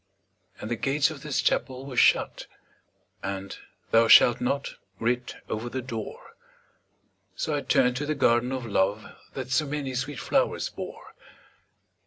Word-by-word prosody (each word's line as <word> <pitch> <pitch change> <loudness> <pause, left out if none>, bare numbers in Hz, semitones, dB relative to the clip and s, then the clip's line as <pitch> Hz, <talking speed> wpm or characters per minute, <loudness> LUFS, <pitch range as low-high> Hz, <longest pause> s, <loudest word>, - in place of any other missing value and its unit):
And 110 - -6
the - - +1
gates 145 +5 +1
of 145 -3 -9
this 150 -2 -1
Chapel 130 0 0
were 135 -2 -7
shut, - - +3 0.7
And 95 0 -5 0.4
'Thou 115 0 +5
shalt 120 +2 +7
not' 140 +3 -1 0.3
writ 125 +2 -1
over 110 +3 -4
the 130 +1 -4
door; 115 -4 -7 1.0
So - - -2
I - - 0
turned 125 0 +2
to 145 - -3
the 155 - 0
Garden 120 -2 +2
of 130 -2 -3
Love 100 0 0 0.3
That 130 -1 -5
so 150 +3 +2
many 140 -2 -3
sweet 130 +2 -3
flowers - - 0
bore. - - -9
125 Hz, 150 wpm, -26 LUFS, 115-135 Hz, 1.0 s, shalt